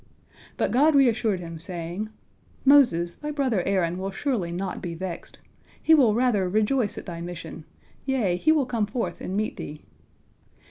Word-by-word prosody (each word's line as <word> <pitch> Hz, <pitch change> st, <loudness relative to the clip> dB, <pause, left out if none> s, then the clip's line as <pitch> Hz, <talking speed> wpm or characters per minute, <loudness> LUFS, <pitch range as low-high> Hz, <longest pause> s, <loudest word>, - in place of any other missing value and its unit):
But -, -, 0 dB
God 295 Hz, +5 st, +4 dB
reassured 230 Hz, -7 st, +3 dB
him, 165 Hz, -1 st, -7 dB
saying, 175 Hz, +4 st, -5 dB, 0.6 s
"Moses, 240 Hz, -12 st, +5 dB
thy 300 Hz, -, -7 dB
brother 265 Hz, -9 st, 0 dB
Aaron 180 Hz, -2 st, 0 dB
will 190 Hz, +1 st, -3 dB
surely 195 Hz, -4 st, -2 dB
not 185 Hz, +1 st, -4 dB
be 170 Hz, -2 st, -5 dB
vexed, 180 Hz, 0 st, -7 dB, 0.4 s
he 320 Hz, -, +4 dB
will 250 Hz, -9 st, +5 dB
rather 225 Hz, -7 st, +2 dB
rejoice 215 Hz, +3 st, +1 dB
at -, -, -7 dB
thy 170 Hz, -2 st, -6 dB
mission, 170 Hz, -2 st, -7 dB, 0.4 s
yea, 245 Hz, -10 st, +1 dB
he 305 Hz, -, +3 dB
will 305 Hz, -4 st, +3 dB
come 230 Hz, -4 st, -1 dB
forth 230 Hz, +3 st, -3 dB
and 190 Hz, -, -3 dB
meet 215 Hz, +1 st, -2 dB
thee." 150 Hz, 0 st, -8 dB
205 Hz, 165 wpm, -25 LUFS, 175-255 Hz, 0.6 s, Moses